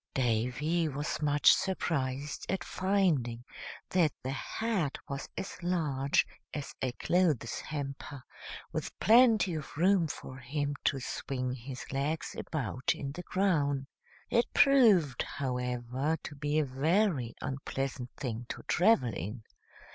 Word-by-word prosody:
Davy 130 +7 +1
was 145 +2 -3
much 145 -1 +6
surprised 145 -7 -2
at 190 - -1
finding 170 -12 +1 0.5
that 170 -5 +4
the 130 - -2
hat 185 +2 -1
was 140 -1 -5
as 190 - -5
large 150 -6 +1 0.3
as 145 -2 -5
a 130 - 0
clothes 155 -8 +1
hamper, 140 -2 -6 0.5
with - - -4
plenty 225 -5 +6
of 150 -2 -6
room 180 0 +4
for 130 -3 -7
him 145 +3 -2
to 135 - +2
swing 125 0 -3
his 130 +1 -7
legs 140 +4 -1
about 130 -4 -1
in 140 -1 -5
the 175 - -6
crown. 150 -8 +1 0.5
It 235 - +2
proved, 215 - +5
however, 125 +2 -2
to - - -6
be 145 +1 -1
a 155 - +3
very 145 - +1
unpleasant 135 -2 -3
thing 120 -3 -4
to - - -6
travel 175 - +3
in. 105 +8 -5
145 Hz, 125 wpm, -31 LUFS, 130-175 Hz, 0.5 s, much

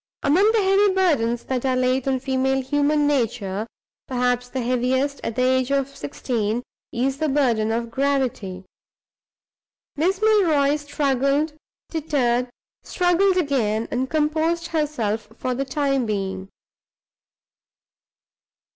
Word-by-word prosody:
Among 370 +10 +4
the 440 -3 +2
heavy 390 +1 +4
burdens 240 -11 +1
that 255 -2 -2
are 260 -1 +1
laid 255 +1 +1
on 265 -1 +1
female 265 0 0
human 290 +2 +1
nature, 225 -7 -1 0.4
perhaps 245 -1 0
the 260 0 -3
heaviest, 255 +3 0
at 230 - -3
the 255 - +1
age 260 0 +2
of 275 0 0
sixteen, 220 - -2 0.3
is 265 +3 -1
the 310 -1 0
burden 240 -6 +1
of 235 0 -2
gravity. 250 -9 -1 1.3
Miss 360 +6 +1
Milroy 325 -10 +3
struggled, 290 0 0 0.4
tittered, 255 -6 0 0.3
struggled 365 +2 +2
again, 235 -9 0
and 260 +1 -1
composed 315 +2 0
herself 230 -10 -2
for 255 - -2
the 270 +2 -2
time 275 -2 0
being. 195 -2 -3
265 Hz, 120 wpm, -23 LUFS, 240-300 Hz, 1.3 s, Among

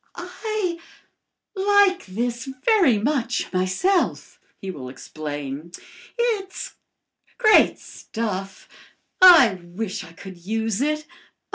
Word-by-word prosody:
"I 425 -6 -4 0.8
like 395 - +3
this 235 +5 -3 0.2
very 380 - +4
much 240 -1 -1
myself," 185 - 0 0.2
he 195 - -5
will 130 -7 -8
explain. 145 +3 -7 0.4
"It's 440 -5 -2 0.6
great 430 -4 +5
stuff. 195 -4 -6 0.5
I 295 - +8
wish 185 +4 -5
I 165 -2 -13
could 190 +2 -11
use 220 +2 -2
it. 305 +1 -1
230 Hz, 95 wpm, -23 LUFS, -, 0.8 s, I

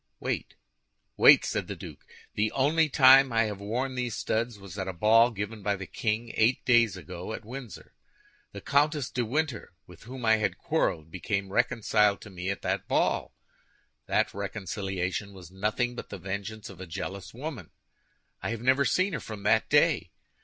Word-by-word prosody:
"Wait, - - -3 0.6
wait!" - - +7
said - - -2
the - - -5
duke. - - -10 0.3
"The 105 +1 0
only 155 +4 +2
time 135 -1 +7
I 115 0 +3
have 105 -3 -4
worn 120 +6 -2
these 125 -3 -3
studs 115 0 -2
was 100 -3 -11
at 95 - -3
a 95 - -3
ball 110 +6 +5
given 105 0 -5
by 100 0 0
the 95 -1 -7
king 115 +4 -2
eight 115 +4 +2
days 115 -6 +4
ago 90 +3 -7
at 110 - -7
Windsor. 125 -3 -9 0.6
The - - -9
Comtesse 145 -1 +1
de 125 - -1
Winter, 130 - -2
with 90 +2 -15
whom 125 0 -7
I 110 0 +5
had 105 -4 -1
quarreled, 80 0 -1
became 95 +2 -3
reconciled 105 -3 +2
to 105 - -11
me 90 0 -5
at 100 - -4
that - - -2
ball. - - 0 0.7
That - - +1
reconciliation 95 -1 -4
was 90 -3 -12
nothing 105 +5 -1
but - - -8
the 100 - -6
vengeance 100 +3 -5
of 95 -1 -12
a 95 - -7
jealous 95 +3 -6
woman. 125 - -7 0.7
I - - -3
have 115 -1 -4
never 130 +2 +3
seen 185 0 +1
her 150 - -2
from 105 -3 -8
that 105 - +2
day. - - +3
110 Hz, 180 wpm, -28 LUFS, 95-125 Hz, 0.7 s, wait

